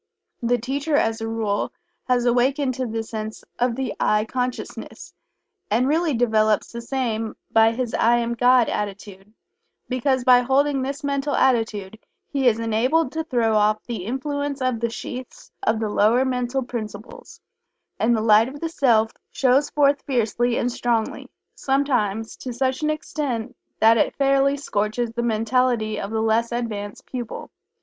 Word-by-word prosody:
The 245 +1 +2
teacher, 280 +6 -2
as 225 -4 +1
a 225 - -2
rule, 220 -3 -1 0.3
has 250 -1 +1
awakened 255 +3 +2
to 255 +1 -3
a 225 0 -2
sense 220 -1 -6 0.2
of 245 -1 +1
the 260 -3 -3
"I" 210 0 +2
consciousness, 250 +2 -5 0.6
and 235 +5 +2
really 315 0 +1
develops 220 -3 +2
the 235 - -6
same 230 -3 -2 0.2
by 225 0 +5
his 240 -1 -3
"I 235 +1 +3
Am 235 0 -1
God" 245 0 +4
attitude, 200 -1 -5 0.6
because 255 0 0
by 250 -1 +7
holding 270 +2 +2
this 275 +3 -4
mental 280 +1 -1
attitude 220 -5 0 0.3
he 275 -3 0
is 225 -2 +4
enabled 245 +7 +1
to 320 0 -2
throw 235 -7 +1
off 215 0 +2
the 225 -7 -5
influence 285 +3 -3
of 255 -3 0
the 235 0 0
sheaths 250 +2 -8
of 220 0 +1
the 220 - -1
lower 225 +5 +3
mental 250 +1 -1
principles, 235 - -8 0.6
and 235 +2 +3
the - - -1
light 220 +2 +5
of 285 +2 -9
the 330 - -3
Self 230 -8 +2 0.2
shows 270 +2 +2
forth 285 -1 +2
fiercely 240 -1 0
and 245 - 0
strongly, 235 -2 -1 0.2
sometimes 245 -6 0
to 255 - -6
such 260 +2 -1
an 305 - +1
extent 265 -6 -3 0.2
that 225 +1 +6
it - - +1
fairly 275 0 +2
scorches 225 -2 -2
the 235 +1 -3
mentality 230 -1 +1
of 200 - -4
the 220 0 -1
less 225 +2 +1
advanced 215 -4 -4
pupil. 245 -3 -6
240 Hz, 160 wpm, -23 LUFS, 220-265 Hz, 0.6 s, by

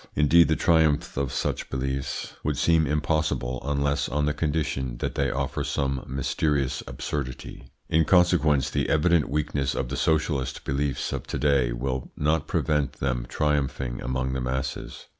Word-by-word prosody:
Indeed 80 +3 +5
the 80 - +2
triumph 80 -4 +2
of 70 -2 -1
such - - -2
beliefs 65 +1 -3
would - - -1
seem 80 -2 +3
impossible 75 -4 0
unless 70 0 0
on 75 0 0
the 75 - +1
condition 75 -5 -1
that - - -3
they 70 -1 0
offer 70 +1 -2
some 70 -2 -1
mysterious 70 +1 0
absurdity. 65 -4 -5 0.2
In 80 0 +3
consequence, 85 -6 +3
the - - 0
evident 80 0 +3
weakness 70 -2 -1
of 65 - -2
the - - -3
socialist 75 -4 0
beliefs 70 0 -1
of - - -4
to - - -3
day 70 -5 +2
will 65 +1 -3
not 75 +1 +1
prevent 75 -2 0
them - - -2
triumphing 70 -4 -1
among 65 +1 -2
the 65 - -2
masses. 65 +2 -4
70 Hz, 155 wpm, -26 LUFS, 65-75 Hz, 0.2 s, Indeed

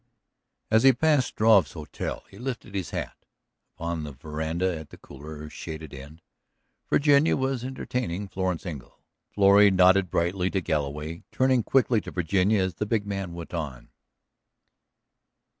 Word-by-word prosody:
As 110 0 +5
he 135 +1 +7
passed 145 0 +2
Struve's 105 - +3
hotel - - -6
he 100 - -15
lifted 125 -5 -5
his 95 -4 -3
hat; - - -5 0.6
upon 85 -1 -3
the 75 - -6
veranda 80 +6 -2
at 80 - -11
the - - -13
cooler, 75 +2 -10
shaded 80 0 -8
end, 75 +4 -11 0.7
Virginia 145 +1 +4
was 130 -2 -1
entertaining 125 -7 -3
Florence 95 -2 -3
Engle. 75 -8 -8 0.3
Florrie 100 0 +6
nodded 95 0 +4
brightly 90 +2 0
to 95 - 0
Galloway, 75 -1 -3
turning 130 -1 +2
quickly 120 -1 +2
to - - -8
Virginia 95 +4 +1
as 95 -1 -2
the 105 +6 -3
big 105 -2 0
man 100 -4 -4
went 85 0 -8
on. 70 -8 -5
95 Hz, 140 wpm, -26 LUFS, 80-110 Hz, 0.7 s, he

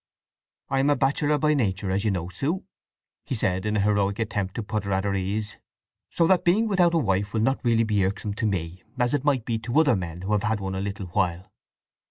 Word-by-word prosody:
"I 135 - +1
am 135 +2 +3
a 145 - +4
bachelor 145 +2 +1
by 150 +1 +2
nature, 95 -8 0
as 95 +1 0
you 110 - +2
know, 90 -3 -2
Sue," 140 - -2 0.6
he 135 - -3
said, 100 -3 0
in 105 0 0
a - - +2
heroic 100 -1 +1
attempt 105 -4 -2
to 115 - -3
put 105 0 -3
her 100 - -4
at 95 0 +1
her 100 -1 0
ease. 100 +2 -2 0.5
"So 170 - +2
that 185 +1 +3
being 205 +6 +3
without 180 -4 +3
a - - +4
wife 100 -6 0
will 110 - +2
not 135 +5 +1
really 115 -2 +3
be 105 -3 +1
irksome 100 +2 -2
to 110 +2 -1
me, 90 -2 -3 0.2
as 125 +1 +1
it 145 -2 0
might 135 -5 +1
be 115 -1 -1
to 120 +6 +1
other 145 -7 +4
men 90 -2 -5
who 100 - -3
have 105 -1 +2
had 110 0 0
one 95 -1 -4
a 95 - -2
little 100 -1 -4
while. 90 -1 -1
105 Hz, 245 wpm, -25 LUFS, 95-135 Hz, 0.6 s, a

